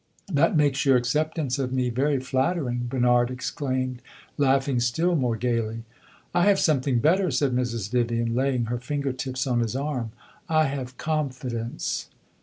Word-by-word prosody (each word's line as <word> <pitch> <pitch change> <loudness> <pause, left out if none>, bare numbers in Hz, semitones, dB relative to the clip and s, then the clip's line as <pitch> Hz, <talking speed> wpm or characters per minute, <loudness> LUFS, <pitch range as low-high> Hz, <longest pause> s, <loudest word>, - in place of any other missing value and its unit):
"That 160 +3 +3
makes 145 -2 +2
your 135 -2 +5
acceptance 145 +2 -1
of 130 -2 -1
me 125 -1 0
very 135 +3 +1
flattering!" 130 -1 -1
Bernard 125 -1 +3
exclaimed, 130 0 -3 0.3
laughing 135 -2 +2
still 160 +9 +1
more 125 -6 +1
gaily. 115 -1 -1 0.5
"I 175 0 +3
have 200 -1 +4
something 135 -5 +2
better," 180 +9 +3
said 135 -1 +1
Mrs. 115 -5 -2
Vivian, 115 -1 0
laying 130 -1 +1
her 120 +1 -3
finger 140 +1 -2
tips 130 0 -3
on 125 -3 +1
his 115 0 -1
arm. 135 -5 -2 0.4
"I 155 -1 +4
have 130 -2 -4
confidence." 130 -7 -3
130 Hz, 150 wpm, -25 LUFS, 120-145 Hz, 0.5 s, your